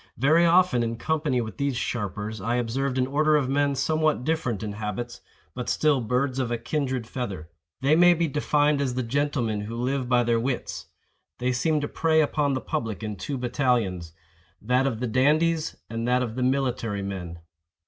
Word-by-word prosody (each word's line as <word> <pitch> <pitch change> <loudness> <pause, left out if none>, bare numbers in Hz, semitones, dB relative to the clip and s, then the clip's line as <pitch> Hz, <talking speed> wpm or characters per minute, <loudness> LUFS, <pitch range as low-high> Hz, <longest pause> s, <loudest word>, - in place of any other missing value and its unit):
Very 155 +7 +4
often, 170 -7 +4
in 115 0 -1
company 150 -2 0
with 110 -2 -6
these 140 -3 -1
sharpers, 105 -2 -3
I 115 +4 0
observed 125 +3 -1
an 130 - +2
order 155 +3 +2
of 140 -4 +1
men 140 0 +1
somewhat 155 0 +1
different 130 -9 -1
in 105 - -3
habits, 105 +3 -5 0.3
but 125 - -4
still 150 -4 +2
birds 125 +3 0
of 125 -3 -1
a 120 - -1
kindred 130 -1 -2
feather. 100 -10 -5 0.3
They 140 +3 +4
may 175 +1 +6
be 170 0 +1
defined 150 0 +1
as 130 -3 -1
the 130 - -1
gentlemen 120 -4 -1
who 110 +3 -6
live 125 +1 -1
by 125 -1 +4
their 115 -1 +2
wits. 125 +2 -3 0.5
They 125 +1 0
seem 150 +5 +1
to 145 - -2
prey 160 +1 +2
upon 145 -2 +1
the 130 - -2
public 115 -2 -3
in 105 -1 -3
two 135 +8 -4
battalions—that 105 - -1
of 115 -4 -3
the 125 - 0
dandies 155 +6 +2
and 115 +1 -3
that 125 +1 +2
of 115 -3 -4
the 130 - -4
military 125 -6 0
men. 90 -4 -5
125 Hz, 185 wpm, -25 LUFS, 115-145 Hz, 0.5 s, may